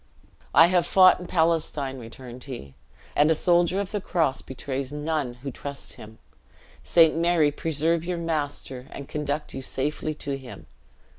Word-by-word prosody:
"I 160 +4 +9
have 175 0 +2
fought 185 -1 +6
in 180 - -8
Palestine," 160 -6 0
returned 120 +1 -10
he, 120 - -8 0.4
"and 150 +1 +4
a 160 - +4
soldier 175 +3 +3
of 200 -2 -3
the 210 - -2
cross 160 -8 0
betrays 135 0 -5
none 150 -4 -2
who 135 - -2
trust 140 +2 -7
him. 110 +1 -12 0.7
Saint 165 -2 +5
Mary 165 -3 +3
preserve 160 +2 0
your 175 0 -2
master 145 -5 -3
and 140 - -8
conduct 150 0 -3
you - - -5
safely 150 +4 -2
to 140 -2 -4
him. 130 -2 -11
150 Hz, 155 wpm, -25 LUFS, 135-165 Hz, 0.7 s, I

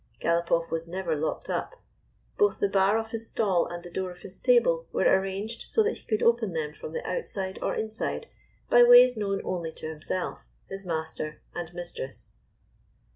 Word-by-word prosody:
Galopoff 170 0 +1
was 165 0 -2
never 175 -2 -2
locked 155 +1 -2
up. - - -3 0.6
Both 415 -1 +2
the 200 - +3
bar 195 +2 +3
of 225 0 -4
his 225 0 -4
stall 190 -6 +1
and 175 0 -7
the 175 - -10
door 185 +1 -2
of 180 0 -12
his 190 - -9
stable - - +3
were - - 0
arranged 195 +4 +1
so 445 - +3
that 435 - 0
he - - -20
could 215 -2 0
open 230 -5 +3
them 155 -2 -2
from - - -8
the 480 - -4
outside 195 - -3
or - - -1
inside, 220 +1 -3 0.4
by 240 - +6
ways 245 +1 +9
known 200 -2 -1
only 170 -3 -2
to - - -7
himself, 160 +4 -4 0.2
his 195 -1 -6
master 160 -2 -4
and 175 -1 -5
mistress. 170 -6 -7
190 Hz, 180 wpm, -27 LUFS, 170-225 Hz, 0.6 s, ways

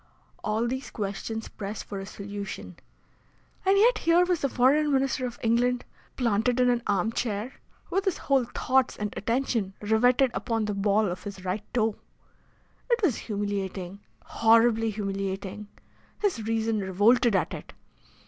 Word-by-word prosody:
All 215 +2 0
these 260 +2 -4
questions 215 +2 -4
pressed 205 +1 -6
for 200 - -6
a 195 - -7
solution, 200 0 -7 0.9
and 390 +1 +4
yet 445 +2 +5
here 335 +2 +4
was 355 -2 0
the 275 - +1
Foreign 285 +5 +3
Minister 265 -1 +1
of 240 - -8
England, 245 +2 +2 0.3
planted 235 +1 +1
in 250 0 +4
an 240 -1 0
arm 205 +1 +1
chair, 230 +2 -2 0.4
with 390 +2 0
his 385 - +1
whole 270 -3 +2
thoughts 260 +2 +1
and 210 -1 -3
attention 230 -3 -1
riveted 245 +5 +3
upon 225 -2 -1
the 210 - -2
ball 200 +2 +2
of 180 0 -4
his 195 -2 -8
right 185 +3 -1
toe! 220 -3 +1 0.9
It 475 -1 +3
was 300 - +3
humiliating 200 -3 -4 0.3
horribly 225 0 +4
humiliating! 195 0 -4 0.5
His 390 - 0
reason 225 -1 0
revolted 205 +4 +3
at 180 - 0
it. - - -8
225 Hz, 150 wpm, -27 LUFS, 200-255 Hz, 0.9 s, yet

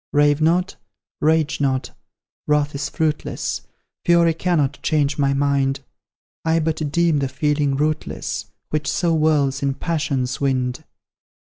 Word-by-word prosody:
Rave 145 0 +3
not, 175 +4 +2 0.4
rage 155 -1 +2
not, 130 -2 0 0.6
wrath 150 0 +2
is 140 +1 -3
fruitless, 155 -1 -2 0.4
Fury 170 -1 +4
cannot 155 -4 0
change 150 -2 +1
my 140 -1 +2
mind; 140 -1 +1 0.6
I 160 0 +2
but 155 -2 -1
deem 170 -2 +2
the 135 -1 -1
feeling 145 +1 0
rootless 155 +2 -2 0.3
Which 155 0 -1
so 170 -3 +1
whirls 145 -4 +2
in 140 -1 0
passion's 140 -7 -2
wind. 130 +1 -1
150 Hz, 125 wpm, -21 LUFS, 140-160 Hz, 0.6 s, Fury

